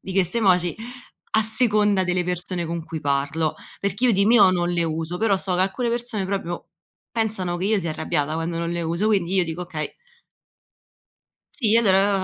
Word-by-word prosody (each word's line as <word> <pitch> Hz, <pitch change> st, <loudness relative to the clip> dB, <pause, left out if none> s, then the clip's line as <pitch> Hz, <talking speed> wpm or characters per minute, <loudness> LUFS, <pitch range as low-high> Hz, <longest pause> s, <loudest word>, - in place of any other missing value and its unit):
di 190 Hz, -, -7 dB
queste 190 Hz, +3 st, +1 dB
emoji, 180 Hz, -5 st, +3 dB, 0.6 s
a 220 Hz, -, +4 dB
seconda 210 Hz, -4 st, +3 dB
delle 180 Hz, 0 st, 0 dB
persone 180 Hz, 0 st, -3 dB
con 165 Hz, 0 st, -4 dB
cui 160 Hz, -1 st, -6 dB
parlo, 145 Hz, +2 st, 0 dB, 0.3 s
perché 200 Hz, +5 st, -1 dB
io 240 Hz, -, +5 dB
di 200 Hz, +1 st, +3 dB
mio 210 Hz, -4 st, +6 dB
non 175 Hz, -1 st, 0 dB
le 170 Hz, -1 st, 0 dB
uso, 165 Hz, +2 st, -3 dB
però 210 Hz, -3 st, +2 dB
so 185 Hz, -1 st, -1 dB
che 185 Hz, -, +3 dB
alcune 235 Hz, +6 st, -1 dB
persone 235 Hz, -4 st, -2 dB
proprio 190 Hz, -3 st, -4 dB, 0.5 s
pensano 210 Hz, -6 st, -1 dB
che 180 Hz, -, -3 dB
io 210 Hz, 0 st, +2 dB
sia 165 Hz, -2 st, -3 dB
arrabbiata 155 Hz, 0 st, -1 dB
quando 165 Hz, +1 st, -3 dB
non 170 Hz, 0 st, -2 dB
le 170 Hz, 0 st, -2 dB
uso, 170 Hz, +6 st, -1 dB
quindi 190 Hz, -3 st, +1 dB
io 185 Hz, -, +4 dB
dico: 165 Hz, +2 st, -5 dB
“Okay". 160 Hz, -3 st, -5 dB, 1.6 s
Sì 225 Hz, -3 st, +3 dB
allora, 195 Hz, -5 st, +5 dB, 0.2 s
io -, -, +1 dB
180 Hz, 190 wpm, -23 LUFS, 170-210 Hz, 1.6 s, mio